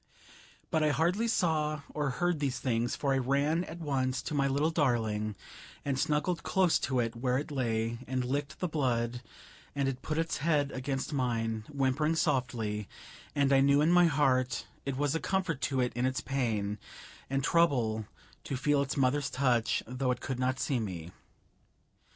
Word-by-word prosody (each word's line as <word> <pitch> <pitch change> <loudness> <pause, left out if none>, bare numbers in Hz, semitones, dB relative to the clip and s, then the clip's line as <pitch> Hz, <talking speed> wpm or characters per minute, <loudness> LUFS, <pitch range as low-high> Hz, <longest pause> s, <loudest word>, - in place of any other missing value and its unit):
But 160 - +2
I 155 - +3
hardly 175 +10 +1
saw 155 -8 +1
or 145 -2 0
heard 175 +5 0
these 135 -3 -1
things, 120 -1 0
for 140 -2 0
I 135 - +2
ran 140 +6 +1
at - - -8
once 130 -4 -1
to - - -4
my 140 -1 +2
little 145 +4 +1
darling, 110 -8 0 0.5
and 135 -2 0
snuggled 150 +5 +1
close 185 -3 +2
to 130 -2 0
it 115 -1 -1
where 125 +1 0
it 150 +2 -4
lay, 115 -3 -1
and 130 0 -1
licked 140 +2 -2
the 180 - +1
blood, 125 -6 0 0.5
and 140 -1 +1
it 130 -1 -3
put 155 +3 -3
its 165 0 0
head 145 -2 +1
against 135 +3 -3
mine, 115 -4 -1
whimpering 145 +3 +1
softly, 115 -8 -1 0.5
and 140 -1 +3
I 135 - +6
knew 140 +1 +5
in 155 +3 +4
my 175 0 +6
heart 135 -4 +1 0.2
it 135 -2 -1
was 145 0 +1
a 165 - 0
comfort 185 -7 -1
to 135 -2 +1
it 125 - 0
in 125 +1 +1
its 130 0 -1
pain 110 -6 -1 0.5
and 135 0 0
trouble 125 - +2 0.4
to 135 - -2
feel 145 +2 +2
its 140 +2 -2
mother's 135 +1 +2
touch, 125 -4 +1
though 125 +2 -2
it 125 -1 0
could 130 -2 -4
not 130 +1 0
see 135 -4 0
me. 90 -6 -5
135 Hz, 180 wpm, -31 LUFS, 125-150 Hz, 0.5 s, I